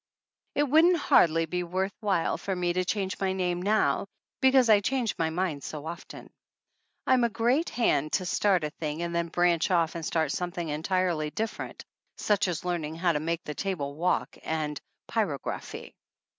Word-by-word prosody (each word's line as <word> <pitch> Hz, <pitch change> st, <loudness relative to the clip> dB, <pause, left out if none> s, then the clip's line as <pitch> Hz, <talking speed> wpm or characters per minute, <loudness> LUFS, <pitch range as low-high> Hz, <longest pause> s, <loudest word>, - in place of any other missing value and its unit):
It 290 Hz, -, +3 dB
wouldn't 320 Hz, +5 st, +5 dB
hardly 165 Hz, -, +4 dB
be 180 Hz, +2 st, -2 dB
worth 185 Hz, +3 st, -2 dB
while 200 Hz, -6 st, +1 dB
for 195 Hz, -, -3 dB
me 175 Hz, -1 st, 0 dB
to 185 Hz, +1 st, +1 dB
change 190 Hz, 0 st, -2 dB
my 190 Hz, -1 st, 0 dB
name 180 Hz, -2 st, -1 dB
now, 205 Hz, 0 st, +1 dB, 0.3 s
because 265 Hz, -2 st, +5 dB
I 215 Hz, -2 st, +6 dB
change 245 Hz, +2 st, 0 dB
my 165 Hz, -1 st, +1 dB
mind 160 Hz, -3 st, -2 dB
so 150 Hz, -1 st, -6 dB
often. 170 Hz, +2 st, -8 dB, 0.7 s
I'm 255 Hz, -2 st, +4 dB
a 235 Hz, -, +3 dB
g~eat 245 Hz, +9 st, +1 dB
hand 155 Hz, -, +1 dB
to 185 Hz, -, +1 dB
start 185 Hz, -1 st, +2 dB
a 150 Hz, -, -2 dB
thing 155 Hz, +1 st, -4 dB
and 170 Hz, 0 st, -3 dB
then 170 Hz, 0 st, 0 dB
branch 175 Hz, -1 st, +2 dB
off 170 Hz, -3 st, +2 dB
a. 170 Hz, -, -4 dB
id 160 Hz, -, -6 dB
start 160 Hz, -3 st, 0 dB
something 175 Hz, -1 st, -3 dB
entirely 160 Hz, 0 st, 0 dB
different, 220 Hz, +7 st, -5 dB, 0.3 s
such 205 Hz, -1 st, +1 dB
as 175 Hz, -1 st, -3 dB
learning 165 Hz, -3 st, -2 dB
how 170 Hz, +1 st, +2 dB
to 150 Hz, -, 0 dB
make 165 Hz, +2 st, -2 dB
the 150 Hz, -, -5 dB
table 150 Hz, -6 st, -3 dB
walk, 170 Hz, +5 st, 0 dB
and 155 Hz, -2 st, -2 dB, 0.3 s
pyrography. 185 Hz, -, -3 dB
180 Hz, 180 wpm, -28 LUFS, 160-200 Hz, 0.7 s, I